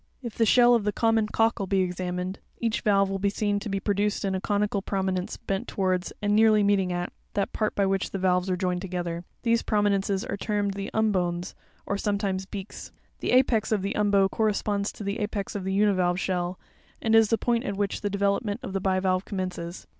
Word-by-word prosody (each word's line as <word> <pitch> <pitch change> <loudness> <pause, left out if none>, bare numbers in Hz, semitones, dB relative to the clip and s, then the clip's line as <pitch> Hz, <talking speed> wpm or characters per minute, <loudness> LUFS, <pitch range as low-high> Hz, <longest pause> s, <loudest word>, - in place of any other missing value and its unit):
If 235 -3 -5
the 225 - +2
shell 245 +2 +6
of 230 -3 +3
the 210 - +1
common 225 0 +2
cockle 225 -2 +1
be 195 0 +2
examined, 180 +1 -3 0.2
each 230 -1 -1
valve 195 -2 +3
will 195 - -2
be 200 +1 +2
seen 205 0 0
to 205 - -6
be 195 0 -1
produced 205 +1 0
into 190 -1 0
a - - -13
conical 205 0 0
prominence 190 -2 -2
bent 195 +5 -3
towards, 185 -2 -1
and 205 0 +2
nearly 215 -1 +5
meeting 200 -2 +2
at, 175 0 -3 0.2
that 200 - -1
part 215 -1 -1
by 200 - +2
which 195 0 0
the - - -4
valves 180 0 +1
are 180 - 0
joined 180 -1 -1
together. 175 -2 -4 0.2
These 230 -1 +3
prominences 200 -2 +1
are - - -4
termed 205 -1 -1
the 200 +1 -5
umbones, 180 -5 0 0.3
or 200 - -2
sometimes 200 -2 -1
beaks. 200 0 -8 0.3
'The - - -3
apex 250 -4 +3
of 210 -3 +1
the 200 - -1
umbo 200 -2 +3
corresponds 205 0 0
to - - -8
the 200 +3 -3
apex 205 -2 -3
of 200 -2 -4
the 190 - -1
univalve 190 -3 +2
shell, 180 -1 -1 0.4
and 225 - 0
is 225 -1 +6
the 225 - +2
point 235 0 0
at 200 -1 -3
which 200 -1 -1
the 205 - -1
development 200 +3 0
of 195 - -5
the 195 - -1
bivalve 185 -1 +1
commences. 185 -3 -5
200 Hz, 210 wpm, -26 LUFS, 185-210 Hz, 0.4 s, shell